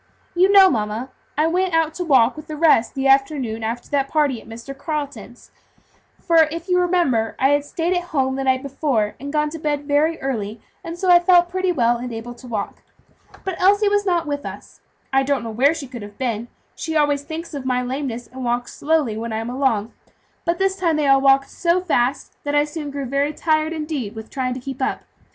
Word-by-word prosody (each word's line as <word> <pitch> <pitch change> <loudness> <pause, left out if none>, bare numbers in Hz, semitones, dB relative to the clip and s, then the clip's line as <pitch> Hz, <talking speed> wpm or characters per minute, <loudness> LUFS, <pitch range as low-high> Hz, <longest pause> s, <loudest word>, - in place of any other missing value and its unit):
You 370 +2 +4
know, 390 -1 +8
mamma, 225 - -2 0.3
I 305 - +3
went 360 +1 +1
out 320 -1 +2
to 360 - -3
walk 260 -7 +4
with 305 0 -10
the 310 - -5
rest 300 -7 +3
the 270 0 -2
afternoon 270 -4 +2
after 230 +2 -3
that 275 -1 +1
party 285 -7 +1
at - - -16
Mr. 235 +5 -8
Carleton's; 290 -1 -6 0.7
for 330 -3 +4
if 335 +1 -6
you 360 -1 +3
remember, 340 -11 +1
I 265 - +3
had 290 0 +2
stayed 335 +4 -1
at 355 0 -1
home 265 -5 0
the 270 - -2
night 260 0 +1
before, 275 -6 -1
and 280 +2 -6
gone 300 0 0
to 325 - -6
bed 290 -1 -2
very 305 +3 +1
early, 225 -5 -3 0.2
and 335 +1 -6
so 365 0 +2
I 350 - +8
felt 350 0 +4
pretty 370 0 0
well 240 -7 +2
and 245 +1 -6
able 230 +1 -6
to 250 +1 -14
walk. 215 -4 -4 0.6
But 380 -3 -4
Elsie 405 +2 +4
was 410 0 +2
not 350 -4 +1
with 285 -1 -3
us. - - -9 0.3
I 270 - +5
don't 270 -2 0
know 225 - -5
where 275 +8 +3
she 295 - -6
could 245 -3 -9
have 205 0 -10
been; 235 -3 -2 0.3
she 320 -1 -4
always 290 -2 +2
thinks 320 +3 -7
of 280 -3 -5
my 250 -1 0
lameness, 250 -2 -4
and 260 +2 -9
walks 240 0 -2
slowly 295 -7 0
when 230 +1 -4
I 220 - -2
am 225 +2 -4
along, 245 -5 0 0.5
but 340 0 +1
this 385 +1 +1
time 335 -4 +1
they 300 -1 +1
all 270 0 +5
walked 275 0 +4
so 345 +1 +1
fast 275 -7 -1
that 290 0 -1
I 290 - +5
soon 300 -1 -6
grew 280 -1 -4
very 280 +3 0
tired, 310 0 +1
indeed, 300 -9 -4
with 220 0 -9
trying 255 -2 -2
to - - -5
keep 265 +1 -7
up. - - -1
285 Hz, 225 wpm, -21 LUFS, 250-325 Hz, 0.7 s, know